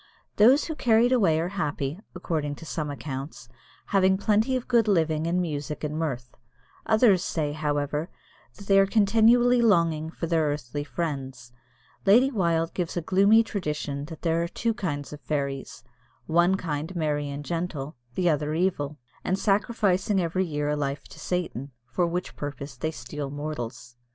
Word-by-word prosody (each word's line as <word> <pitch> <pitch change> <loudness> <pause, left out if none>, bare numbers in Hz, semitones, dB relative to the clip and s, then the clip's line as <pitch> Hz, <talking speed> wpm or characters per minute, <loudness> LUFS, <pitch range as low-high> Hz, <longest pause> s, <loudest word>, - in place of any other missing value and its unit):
Those 250 +8 +6
who 320 - -3
are - - -10
carried 235 -2 +3
away 190 -11 +3
are 170 +2 -1
happy, 150 -4 -3 0.2
according 155 -5 -2
to 165 - -11
some 155 -2 -3
accounts, 135 -2 -6 0.4
having 190 -1 +3
plenty 215 +5 +2
of 255 - -3
good 235 -3 +3
living 160 -5 +2
and 175 +2 +1
music 150 -4 -3
and 150 0 -2
mirth. 130 -6 -3 0.5
Others 220 -4 +4
say, 150 -5 -1
however, 150 +1 -2 0.5
that 200 - -12
they 195 0 +5
are 195 - +5
continually 230 +4 +4
longing 165 -8 +2
for 165 - -5
their 165 -1 +1
earthly 145 -1 -3
friends. 135 -6 -5 0.5
Lady 240 +7 +5
Wilde 170 -7 0
gives 175 -1 -3
a - - 0
gloomy 200 +6 +5
tradition 150 -9 -3
that 160 0 -10
there 165 -1 +1
are 170 - -1
two 230 +6 -1
kinds 145 - -4
of 150 - -9
fairies 140 -4 -3 0.4
one 175 +3 +3
kind 160 0 -4
merry 150 -3 -1
and 140 +1 -6
gentle, 165 -4 -3 0.2
the 180 - +1
other 150 -1 +1
evil, 155 -5 -1 0.3
and 185 - 0
sacrificing 200 -1 +1
every 185 +2 0
year 150 -2 -2
a 150 - +1
life 140 -1 -2
to - - -13
Satan, 165 -7 -3 0.2
for 150 +9 0
which 175 +2 -3
purpose 145 0 -6
they 145 +6 -2
steal 145 -1 -6
mortals. 135 -5 -6
165 Hz, 165 wpm, -26 LUFS, 145-195 Hz, 0.5 s, Those